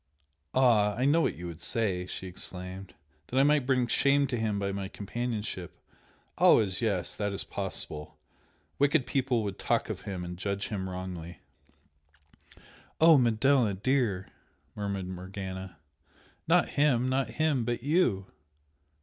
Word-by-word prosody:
"Ah? 110 -6 +4
I 125 - 0
know 155 +4 +4
what - - 0
you 90 - -8
would 85 -1 -7
say!" 90 -1 -1
she 95 - -6
exclaimed, 90 +1 -7 0.3
"That 130 - 0
I - - +6
might 145 -2 +3
bring 130 -2 +3
shame 140 +4 +3
to 125 - -1
him 110 -2 -1
by 100 0 -1
my 100 0 -4
companionship 105 -3 -4 0.6
always 95 -3 +5
yes! 100 -6 0
that 105 -1 -2
is 100 - -2
possible! 75 0 -4 0.6
wicked 140 -1 +3
people 130 -4 0
would 100 -2 -4
talk - - 0
of - - -6
him 95 -3 -5
and 90 0 -7
judge 100 0 -2
him 95 -3 -3
wrongly 90 -2 -7 0.8
" 75 0 -26
"Oh, 160 0 +8
Manella, 120 -2 +3
dear!" 110 -3 0 0.5
murmured 100 -2 -3
Morgana 95 -1 -7 0.7
"Not - - +4
him 130 -4 +2
not 130 +1 0
him 150 -5 +2
but 120 0 -2
YOU!" 140 - +2
105 Hz, 145 wpm, -29 LUFS, 95-130 Hz, 0.8 s, Oh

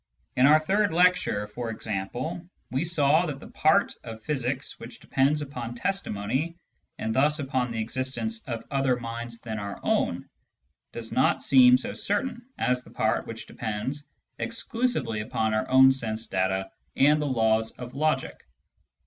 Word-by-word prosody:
In 130 +2 +5
our 155 +2 +7
third 200 +5 +1
lecture, 175 - +3
for 115 +3 -6
example, 110 - -4 0.3
we 130 +4 0
saw 160 0 +3
that 140 -3 -5
the - - -12
part 155 +6 +3
of 110 -1 -9
physics 135 -2 -2
which 115 +1 -9
depends 145 +3 +1
upon 125 -4 -6
testimony, 155 - -2 0.4
and 110 0 -2
thus 150 +5 +3
upon 130 -4 -1
the 115 -1 -4
existence 130 - -2
of 115 -3 -4
other 135 -2 +2
minds 115 0 -6
than 110 -3 -5
our 100 -1 -6
own, - - 0 0.6
does 115 -1 -7
not - - +2
seem 125 -2 +7
so 130 - -4
certain 235 +4 -1 0.2
as 125 0 +1
the - - -16
part 110 0 0
which 115 0 -7
depends 120 +6 -4 0.4
exclusively 230 - -1
upon 110 0 -1
our 110 - -1
own 130 +1 +7
sense 115 -4 -1
data 95 -1 -1 0.2
and 150 +2 +4
the 150 - -1
laws 110 -3 +2
of 125 0 -9
logic. 150 -2 -1
130 Hz, 155 wpm, -27 LUFS, 115-150 Hz, 0.6 s, our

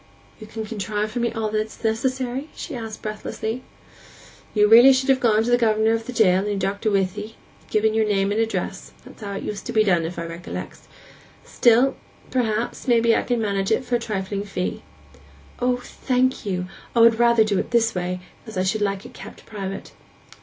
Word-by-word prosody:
'You 215 - -10
can 220 0 -6
contrive 210 0 -3
for 240 - -3
me 235 0 0
all 220 -2 -2
that's 215 +2 -3
necessary?' 255 +5 -1
she - - -7
said 225 -3 -6
breathlessly. 220 +2 -4 0.9
'You 210 - +4
should 210 - +4
really 245 +4 +9
have 260 0 +2
gone 220 -3 +3
to 240 - -1
the 245 - +4
governor 220 -1 +3
of 225 0 -2
the - - -4
jail, 190 -6 +4
and 200 - -2
your 205 -1 -1
doctor 200 +3 -1
with 195 -2 +1
'ee, 215 +2 -8 0.3
and - - -25
given 215 0 +2
your 220 -1 +2
name 195 -1 +1
and 215 +2 +1
address—that's 225 +1 -5
how 200 -1 -5
it 195 - -5
used 210 -2 -5
to - - -3
be 215 -1 +4
done, 175 -5 +2
if 170 +2 -5
I 170 - -3
recollect. 170 +1 -7 0.7
Still, 245 +3 +4 0.4
perhaps, 235 0 -1
I 235 -1 +5 0.2
can 245 -2 -1
manage 195 -2 -1
it 255 - +1
for 245 - -5
a - - -8
trifling 200 -3 -3
fee.' 195 -3 -3 0.8
'O, 250 0 +1
thank 255 -1 -1
you! 180 -2 -1 0.3
I - - +3
would 230 0 +6
rather 235 -1 +5
do 205 -3 0
it - - -3
this 230 -1 +2
way, 180 0 -3 0.3
as 220 -3 -7
I 185 - +2
should 210 +3 0
like 200 -1 -1
it - - -11
kept - - -11
private. 195 -3 -6
220 Hz, 205 wpm, -23 LUFS, 200-235 Hz, 0.9 s, really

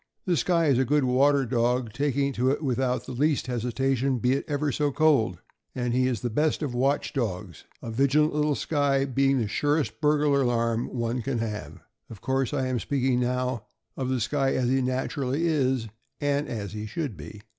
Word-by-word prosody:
The 180 - +2
Skye 170 0 +2
is 135 -4 +3
a - - +4
good 145 +3 +2
water 135 +2 +3
dog, 120 -1 0
taking 140 +1 0
to 125 +1 +1
it 145 +3 -1
without 130 -1 0
the - - -7
least 145 +3 +1
hesitation, 130 +2 0
be 125 +2 +1
it 140 - -2
ever 145 0 -1
so 145 +2 0
cold; 135 - +2 0.4
and 125 -1 -1
he 130 +1 +2
is 120 -5 -2
the 120 - -1
best 155 +6 +1
of 140 -4 -3
watch 135 +4 0
dogs 95 - -4
— - - -36
a 115 - -5
vigilant 140 +6 +2
little 150 -1 +1
Skye 140 -3 +1
being 135 +1 +2
the 115 -4 0
surest 145 -1 -1
burglar 150 -1 +3
alarm 115 -2 0
one 120 0 -2
can 135 +1 -2
have. 105 -2 -5 0.3
Of 110 - -10
course 130 +2 -1
I 135 -3 -1
am 130 -2 -1
speaking 130 -1 0
now 125 -1 -1 0.3
of 130 -1 -3
the 130 -1 0
Skye 135 +4 0
as 125 -1 +1
he 135 +1 +2
naturally 130 +3 -1
is, 135 -7 +1 0.3
and 145 +1 0
as 105 -4 -5
he 105 0 -5
should 130 0 -4
be. 85 +7 -10
130 Hz, 200 wpm, -26 LUFS, 120-145 Hz, 0.4 s, a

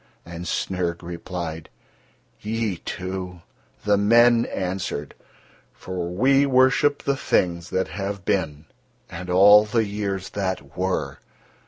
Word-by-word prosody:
And 85 +1 -8
Snyrg 90 -2 -2
replied: 85 -2 -6 0.7
"Ye, 110 -3 -2
too?" 90 -1 -6 0.4
The 105 -1 +3
men 115 +3 +5
answered: 90 -6 -4 0.6
"For 90 -2 -5
we 135 +10 +3
worship 130 +2 +3
the 140 - +1
things 85 -9 0
that 95 -2 -1
have 100 +2 -5
been 80 -5 -1 0.5
and 90 +1 -7
all 100 +3 +7
the 110 +1 0
years 100 -2 -3
that 95 -2 -4
were. 95 +1 -2
95 Hz, 115 wpm, -23 LUFS, 90-105 Hz, 0.7 s, all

